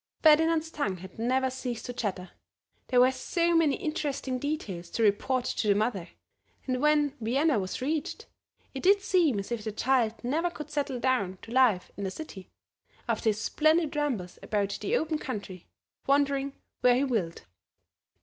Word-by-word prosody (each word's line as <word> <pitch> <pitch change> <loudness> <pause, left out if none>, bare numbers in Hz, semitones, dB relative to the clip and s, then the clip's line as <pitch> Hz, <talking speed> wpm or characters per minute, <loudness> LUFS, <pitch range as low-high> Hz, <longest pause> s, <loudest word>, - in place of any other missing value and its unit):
Ferdinand's 320 +1 +4
tongue 205 - -2
had 185 +3 -12
never 260 +3 +1
ceased 250 -2 -5
to 245 - -5
chatter, 190 -6 -4 0.6
there 250 - +3
were 255 +1 +6
so 340 +6 0
many 315 -4 +4
interesting 280 -4 -3
details 215 - -4
to 230 - -1
report 240 +5 +2
to 220 - -1
the 200 - +4
mother; 205 -4 -1 0.6
and 255 -1 -1
when 295 -1 +3
Vienna 270 +3 +2
was 190 +6 -4
reached 300 +2 -2 0.5
it 265 - -5
did 395 +1 +4
seem 335 - +3
as 200 +3 -5
if 235 -3 -2
the 215 - -3
child 235 0 +1
never 315 +8 0
could 300 -3 -9
settle 280 -3 -2
down 205 -8 0
to 225 - -10
life 240 -8 +3
in 200 - -4
the 190 - -1
City, 190 -6 -9 0.6
after 225 -1 +1
his 210 -1 -1
splendid 310 +6 +2
rambles 250 -12 -2
about 205 -2 -1
the 470 +5 +1
open 315 -1 -1
country, 200 - -6 0.4
wandering 275 0 +2 0.3
where 250 -1 +5
he 260 - +2
willed. 215 -11 -2
255 Hz, 170 wpm, -28 LUFS, 215-300 Hz, 0.6 s, were